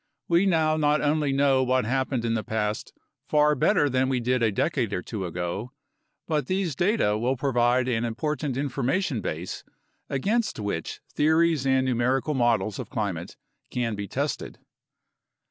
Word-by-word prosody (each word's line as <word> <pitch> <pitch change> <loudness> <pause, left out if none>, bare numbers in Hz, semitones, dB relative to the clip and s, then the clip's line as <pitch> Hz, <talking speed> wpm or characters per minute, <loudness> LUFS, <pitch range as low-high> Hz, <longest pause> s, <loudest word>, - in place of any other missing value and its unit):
We 175 +3 +3
now 160 -3 +2
not 150 0 +3
only 150 -1 +1
know 135 -1 +3
what 130 -1 +1
happened 130 0 -1
in 115 - +1
the 110 -1 -1
past 105 -1 -2 0.4
far 150 0 +4
better 150 +3 +3
than 130 -1 +1
we 130 -2 +1
did 125 +1 0
a 110 -2 +3
decade 125 0 0
or 90 - -2
two 100 -5 -4
ago, 90 +8 -4 0.5
but 150 -5 0
these 185 -6 -1
data 175 - +1
will 125 +3 0
provide 125 -1 +2
an 120 -2 0
important 135 +3 -2
information 140 - -1
base 85 0 -5 0.5
against 215 - 0
which 100 -6 -4
theories 160 -2 +3
and 130 0 +3
numerical 130 +4 +1
models 115 -6 +1
of - - -6
climate 100 -8 -3 0.3
can 120 -3 -1
be 100 -1 -4
tested. - - -3
130 Hz, 155 wpm, -26 LUFS, 115-150 Hz, 0.5 s, far